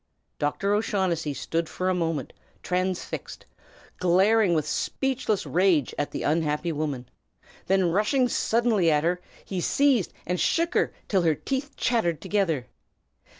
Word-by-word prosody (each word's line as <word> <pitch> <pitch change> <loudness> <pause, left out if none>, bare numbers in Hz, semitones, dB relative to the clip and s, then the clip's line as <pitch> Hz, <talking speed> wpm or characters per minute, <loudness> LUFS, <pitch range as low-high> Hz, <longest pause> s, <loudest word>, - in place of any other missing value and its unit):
Dr. 195 +8 0
O'Shaughnessy 185 -8 0
stood 165 +2 -2
for 185 - -3
a 185 - +3
moment 165 -6 -2 0.3
transfixed, 185 0 -3 0.5
glaring 190 +2 +4
with 155 -1 0
speechless 240 - -1
rage 175 -7 +2
at 145 - -2
the - - -5
unhappy 155 +2 0
woman; 145 -5 -3 0.6
then 190 -2 +3
rushing 230 - +2
suddenly 225 -6 +2
at 150 -1 +2
her, 175 +2 0 0.2
he 185 -2 -3
seized 270 -2 +2
and 180 0 -1
shook 335 +1 +1
her - - +2 0.2
till 195 -3 +2
her 160 -3 +2
teeth 275 - -4
chattered 195 -10 +1
together. 165 -11 0
180 Hz, 135 wpm, -26 LUFS, 160-210 Hz, 0.6 s, glaring